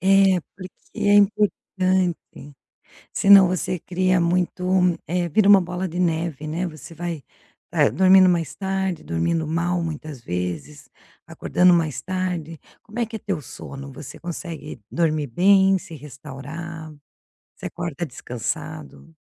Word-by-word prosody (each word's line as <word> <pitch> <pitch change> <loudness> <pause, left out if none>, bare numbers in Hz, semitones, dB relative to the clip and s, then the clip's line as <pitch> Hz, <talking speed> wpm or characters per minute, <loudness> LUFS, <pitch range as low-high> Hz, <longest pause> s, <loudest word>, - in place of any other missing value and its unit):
É, 195 -1 +4 0.2
porque 185 -1 -9 0.3
é 205 0 +3
importante, 185 -7 0 0.6
senão 195 -2 +7
você 185 0 -2
cria 185 +1 +1
muito 180 +1 0 0.4
eh, 175 0 -1
vira 200 +5 +3
uma 200 -1 +8
bola 180 +1 -3
de 175 +2 -6
neve, 165 -3 -1
né, 165 +4 -2
você 160 0 -10
vai, 170 -2 -5 0.5
eh, - - +3
dormindo 190 0 +6
mais 170 -3 0
tarde, 190 -3 -2
dormindo 155 - -1
mal 175 +2 0
muitas 155 -5 -6
vezes, 90 - -5 0.4
acordando 180 0 +3
mais 160 -4 0
tarde. 180 -4 -3 0.2
Como 220 +3 -10
é 235 - +1
que 225 - -7
é - - -6
teu 195 -5 -3
sono? 140 +2 -9
Você 145 0 -10
consegue 165 -5 -7
dormir 155 -3 0
bem, 190 +8 +4
se 170 - -11
restaurar? 150 +3 -9 0.6
Você - - -6
acorda 170 -2 -4
descansado? 155 +5 -6
170 Hz, 135 wpm, -23 LUFS, 155-185 Hz, 0.6 s, uma